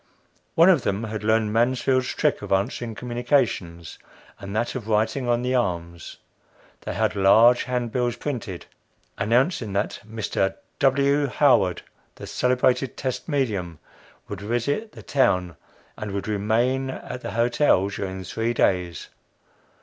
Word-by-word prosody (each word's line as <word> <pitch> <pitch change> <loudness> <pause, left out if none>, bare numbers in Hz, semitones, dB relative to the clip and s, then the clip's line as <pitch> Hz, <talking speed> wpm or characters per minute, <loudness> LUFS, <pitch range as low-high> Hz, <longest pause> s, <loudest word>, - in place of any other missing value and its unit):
One 165 +2 +6
of 170 -7 +5
them 100 +1 -2
had 110 -1 -5
learned 110 0 +2
Mansfield's 130 +2 +2
trick - - +1
of - - -8
answering 110 +3 -1
communications 120 - -1 0.4
and 100 +1 -7
that 115 +2 -1
of 120 -5 -6
writing 110 +4 0
on 120 0 +1
the 125 +1 0
arms. 85 -8 -2 0.6
They - - -5
had 110 +1 0
large 110 +5 +5
handbills 125 -1 -1
printed, 120 -9 -5 0.5
announcing 115 - +1
that 100 +1 -1
"Mr. 105 -3 -2 0.2
W. 140 +1 +3
Howard, 125 -9 +3 0.3
the - - -9
celebrated 125 +1 +1
test 130 +4 -4
medium, 105 - -1 0.5
would 100 -2 -7
visit 120 - -2
the - - -12
town 90 -10 +1
of, - - -20 0.4
and 105 -1 -5
would 100 +1 -3
remain 115 +6 0
at 125 -1 -7
the - - -6
Hotel 120 -3 +2
during 95 -1 -5
three 115 +6 -2
days." 90 -5 0
115 Hz, 135 wpm, -24 LUFS, 100-125 Hz, 0.6 s, One